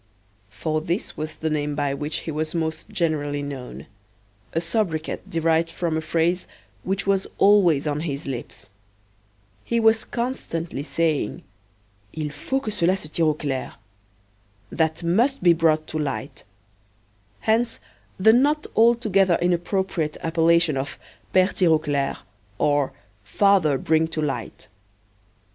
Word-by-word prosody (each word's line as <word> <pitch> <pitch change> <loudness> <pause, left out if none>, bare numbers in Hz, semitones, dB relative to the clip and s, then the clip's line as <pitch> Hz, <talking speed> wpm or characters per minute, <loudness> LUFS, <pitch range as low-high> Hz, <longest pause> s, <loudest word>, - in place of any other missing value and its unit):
For 130 +10 -2
this 170 +6 -3
was 155 0 -5
the 160 - -2
name 150 -1 -1
by 145 -2 0
which 150 +2 -3
he 160 - -5
was 155 +2 -3
most 160 +2 -3
generally 155 -7 -1
known: 135 -3 -7 0.7
a 165 - 0
sobriquet 170 -2 -1
derived 165 0 +1
from 165 -1 -2
a 160 - 0
phrase 170 +3 0 0.3
which 195 +1 -2
was 195 -1 +1
always 185 -8 +5
on 150 -1 -1
his 150 -2 -4
lips. 120 -6 -7 0.9
He 235 - 0
was 225 0 +4
constantly 175 - -3
saying: 155 -5 -1 0.7
"Il 155 -1 -3
faut 270 - -2
que 215 - -3
cela 185 -1 +1
se 155 -5 -7
tire 165 +1 +1
au 155 - +2
clair: 135 -4 -4 1.0
That 160 0 0
must 225 +9 +2
be 175 -2 +7
brought 160 -2 +2
to 155 - -3
light." 140 -1 -4 1.0
Hence, 225 +2 +1 0.4
the 220 +4 +6
not 295 +5 +3
altogether 215 -6 +4
inappropriate 175 -2 0
appellation 165 -2 +3
of 135 +2 -4 0.3
"Pere 185 0 +4
Tirauclair," 155 -5 +1 0.4
or 145 -2 +2 0.3
"Father 160 - +3
Bring 160 +3 +2
to 160 - -5
Light." 140 -6 -4
165 Hz, 130 wpm, -23 LUFS, 150-190 Hz, 1.0 s, be